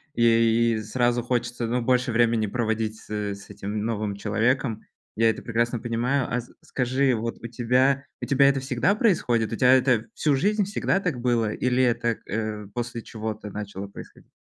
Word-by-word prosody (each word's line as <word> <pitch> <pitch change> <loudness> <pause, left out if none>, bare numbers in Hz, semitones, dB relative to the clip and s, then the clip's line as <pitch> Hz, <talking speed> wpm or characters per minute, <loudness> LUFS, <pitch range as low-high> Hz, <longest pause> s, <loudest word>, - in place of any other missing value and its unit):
И 115 -1 +3
сразу 120 +2 +1
хочется, 120 -1 -2
ну, 125 +1 0
больше 125 +1 +1
времени 115 -1 +2
проводить 110 -1 -1
с - - -18
с 105 -1 -4
этим 105 +1 -4
новым 105 -3 -2
человеком. 110 +3 0 0.3
Я 115 +1 +4
это 110 - -2
прекрасно 115 0 -1
понимаю. 120 +3 0
А 125 - -1
с 120 - -17
скажи, 130 0 +1
вот, 115 +1 -3
у 115 - -5
тебя 125 +4 +2 0.2
у - - -2
тебя 140 0 +5
это 135 -1 +1
всегда 135 - +1
происходит? 120 - +1
У - - 0
тебя 125 +2 +5
это 125 -4 +3
всю 145 -3 +2
жизнь 205 +7 +1
всегда 195 -1 0
так 170 -10 -2
было 115 -3 +1
или 125 0 +1
это, 120 -2 +1
э, 110 -1 -3
после 120 -1 -4
чего-то 110 -1 -6
начало 100 -1 -6
происходить? 100 - -13
120 Hz, 175 wpm, -25 LUFS, 110-125 Hz, 0.3 s, тебя